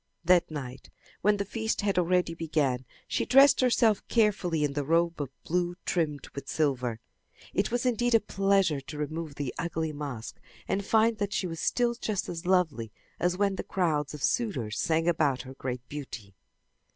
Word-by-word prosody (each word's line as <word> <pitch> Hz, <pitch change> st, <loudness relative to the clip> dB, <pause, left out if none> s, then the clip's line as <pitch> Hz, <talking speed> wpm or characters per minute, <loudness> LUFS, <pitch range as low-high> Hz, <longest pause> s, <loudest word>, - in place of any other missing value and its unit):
That 180 Hz, 0 st, +4 dB
night 130 Hz, -5 st, -7 dB, 0.3 s
when 210 Hz, 0 st, +3 dB
the 200 Hz, -, -2 dB
feast 220 Hz, +2 st, -2 dB
had 200 Hz, -2 st, +1 dB
already 180 Hz, -1 st, +2 dB
begun, 150 Hz, -6 st, -1 dB, 0.2 s
she -, -, 0 dB
dressed 275 Hz, +2 st, +6 dB
herself 235 Hz, -4 st, +3 dB
carefully 195 Hz, -8 st, +2 dB
in 145 Hz, -1 st, 0 dB
the 145 Hz, 0 st, -1 dB
robe 165 Hz, +2 st, +1 dB
of 140 Hz, -, -3 dB
blue 175 Hz, +1 st, 0 dB
trimmed 155 Hz, -5 st, -1 dB
with 140 Hz, -, -7 dB
silver. 125 Hz, -7 st, 0 dB, 0.5 s
It 195 Hz, -, +1 dB
was 245 Hz, +2 st, -1 dB
indeed 245 Hz, -1 st, +2 dB
a -, -, +7 dB
pleasure 195 Hz, -7 st, +1 dB
to 150 Hz, +3 st, -9 dB
remove 155 Hz, 0 st, -4 dB
the 140 Hz, -4 st, -3 dB
ugly 160 Hz, -2 st, -2 dB
mask 140 Hz, -6 st, -6 dB, 0.3 s
and 200 Hz, -, 0 dB
find 220 Hz, +1 st, +3 dB
that 205 Hz, 0 st, -1 dB
she -, -, 0 dB
was 165 Hz, -2 st, -5 dB
still 240 Hz, +5 st, +1 dB
just 215 Hz, -4 st, -2 dB
as 175 Hz, 0 st, -5 dB
lovely 160 Hz, -, +1 dB, 0.3 s
as 180 Hz, 0 st, +1 dB
when 200 Hz, -1 st, +1 dB
the -, -, -3 dB
crowds 155 Hz, -5 st, 0 dB
of 145 Hz, -, -8 dB
suitors 130 Hz, -, 0 dB
sang 165 Hz, -1 st, +1 dB
about 150 Hz, -6 st, +2 dB
her 130 Hz, -, -9 dB
great 125 Hz, -2 st, -5 dB
beauty. 120 Hz, -9 st, -7 dB
165 Hz, 175 wpm, -28 LUFS, 145-200 Hz, 0.5 s, a